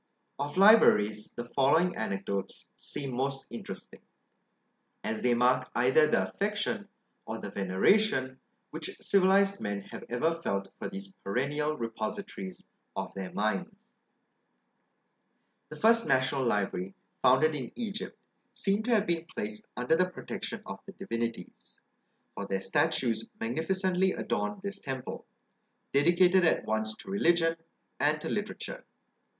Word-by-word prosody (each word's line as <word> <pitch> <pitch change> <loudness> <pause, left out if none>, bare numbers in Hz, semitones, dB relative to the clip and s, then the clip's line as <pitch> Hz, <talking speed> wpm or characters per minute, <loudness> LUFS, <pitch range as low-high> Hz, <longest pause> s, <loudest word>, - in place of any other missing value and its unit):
Of 145 +3 -3
LIBRARIES, 110 - +6
the 120 - -5
following 140 +8 +3
anecdotes 100 -2 -3
seem 135 -3 -4
most 135 +2 -2
interesting, 115 - -8 1.0
as 110 - -2
they 125 -1 +3
mark 125 +1 +3
either 130 +6 +5
the - - +2
affection, 205 0 -2 0.4
or - - -3
the - - -7
veneration, 130 - +2 0.3
which - - -6
civilised 195 +1 +3
men 100 -1 -2
have - - -9
ever 140 +8 +1
felt 100 -13 -2
for - - -4
these 195 +1 -8
perennial 145 +8 -1
repositories 115 - -5 0.3
of - - -4
their 95 -2 -5
minds. 110 - 0 2.0
The - - -8
first 230 +1 +4
national 130 0 +2
library 95 -3 -1 0.3
founded 135 +5 +5
in 130 -5 -4
Egypt 220 -3 -4 0.4
seemed 200 +2 +1
to 240 -1 +3
have 210 -1 +2
been 170 -1 0
placed 105 -9 -5
under 125 +6 +2
the 185 +2 +2
protection 180 - -5
of - - -6
the - - -9
divinities, 115 0 -5 0.5
for - - -5
their 95 0 -1
statues 120 0 +1
magnificently 185 - +1
adorned 205 -1 -2
this 200 0 -4
temple, 130 -5 -6 0.7
dedicated 175 +6 +5
at 165 - +3
once 110 0 -1
to 190 - -10
religion 170 -4 +3 0.4
and - - +2
to - - -4
literature. - - -4
140 Hz, 130 wpm, -30 LUFS, 115-190 Hz, 2.0 s, LIBRARIES